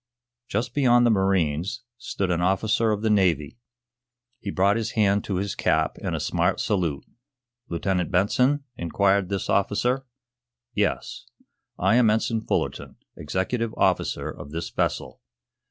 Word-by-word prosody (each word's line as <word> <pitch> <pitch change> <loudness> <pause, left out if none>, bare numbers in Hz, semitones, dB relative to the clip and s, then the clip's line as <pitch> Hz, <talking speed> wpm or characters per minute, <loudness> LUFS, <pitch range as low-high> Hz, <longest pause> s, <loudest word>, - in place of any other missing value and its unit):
Just 120 +4 -2
beyond 120 -4 +4
the 120 - +4
marines, 95 0 0 0.2
stood 95 -2 -2
an 85 0 0
officer 105 +5 +2
of 105 0 -1
the 110 - +2
Navy. 90 - +1 0.8
He 100 - -6
brought 100 +1 +2
his 115 -1 -2
hand 100 -2 +2
to 100 - -2
his 100 +1 -2
cap - - 0
in - - -3
a - - -2
smart - - 0
salute. 85 -9 -1 0.6
"Lieutenant 90 0 -1
Benson?" 125 +10 +2
inquired 95 +1 +1
this 100 -1 -2
officer. 120 +7 +1 0.7
"Yes." 105 -2 -2 0.5
"I 100 +6 +3
am 120 -3 +5
Ensign 110 +1 +1
Fullerton, - - -2 0.2
executive 110 +9 -2
officer - - +1
of 70 - -10
this 80 +2 -5
vessel." - - -2
100 Hz, 140 wpm, -25 LUFS, 90-115 Hz, 0.8 s, am